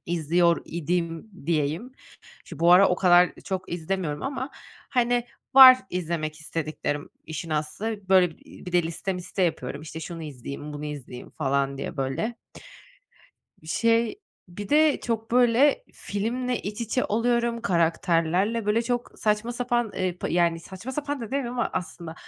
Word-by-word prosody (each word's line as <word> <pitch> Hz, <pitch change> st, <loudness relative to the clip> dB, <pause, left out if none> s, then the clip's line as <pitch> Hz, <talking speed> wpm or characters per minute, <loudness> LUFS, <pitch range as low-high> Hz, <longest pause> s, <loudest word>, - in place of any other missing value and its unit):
İzliyor 170 Hz, +1 st, +2 dB
idim 170 Hz, +3 st, -3 dB, 0.2 s
diyeyim. 160 Hz, -, -1 dB, 0.5 s
Şu -, -, -10 dB
bu 170 Hz, +1 st, +5 dB
ara 190 Hz, +2 st, +7 dB
o 180 Hz, -, +2 dB
kadar 180 Hz, -1 st, +5 dB
çok 190 Hz, -3 st, -4 dB
izlemiyorum 170 Hz, -3 st, -3 dB
ama, 270 Hz, 0 st, -3 dB, 0.4 s
hani, 245 Hz, -1 st, +2 dB, 0.3 s
var 260 Hz, -1 st, +11 dB
izlemek 160 Hz, -3 st, -3 dB
istediklerim, 155 Hz, -2 st, -4 dB
işin 160 Hz, +1 st, -6 dB
aslı. 190 Hz, +7 st, -3 dB
Böyle, 185 Hz, -3 st, +4 dB
iii, -, -, -15 dB
bir 180 Hz, -, -6 dB
de 175 Hz, 0 st, +4 dB
liste 170 Hz, +4 st, -3 dB
miste 180 Hz, +1 st, -3 dB
yapıyorum, 140 Hz, -5 st, -1 dB
işte, 160 Hz, +1 st, -8 dB
şunu 165 Hz, +1 st, -7 dB
izleyeyim, 145 Hz, 0 st, -7 dB
bunu 145 Hz, 0 st, -6 dB
izleyeyim 140 Hz, -4 st, -8 dB
falan 140 Hz, -1 st, -1 dB
diye, 160 Hz, -, -5 dB
böyle. 135 Hz, -, -2 dB, 1.3 s
Şey, 230 Hz, -, +1 dB, 0.3 s
bir 200 Hz, +3 st, -8 dB
de 305 Hz, 0 st, +4 dB
çok, 225 Hz, -1 st, -3 dB
böyle, 250 Hz, -, +4 dB
filmle 240 Hz, +4 st, -2 dB
iç 210 Hz, +3 st, -5 dB
içe 235 Hz, +3 st, 0 dB
oluyorum. 235 Hz, +1 st, +1 dB
Karakterlerle, 175 Hz, +2 st, +1 dB
böyle, 215 Hz, +3 st, +2 dB
çok 245 Hz, 0 st, -3 dB
saçma 215 Hz, +2 st, 0 dB
sapan, 240 Hz, 0 st, 0 dB
ııı, 185 Hz, -1 st, -1 dB
pı -, -, -3 dB
yani, 170 Hz, -1 st, +2 dB
saçma 190 Hz, +9 st, -8 dB
sapan 290 Hz, 0 st, -3 dB
da -, -, -4 dB
demiyeyim 245 Hz, +1 st, -3 dB
ama 245 Hz, -, -1 dB
aslında, 170 Hz, -2 st, -5 dB
180 Hz, 150 wpm, -25 LUFS, 165-235 Hz, 1.3 s, var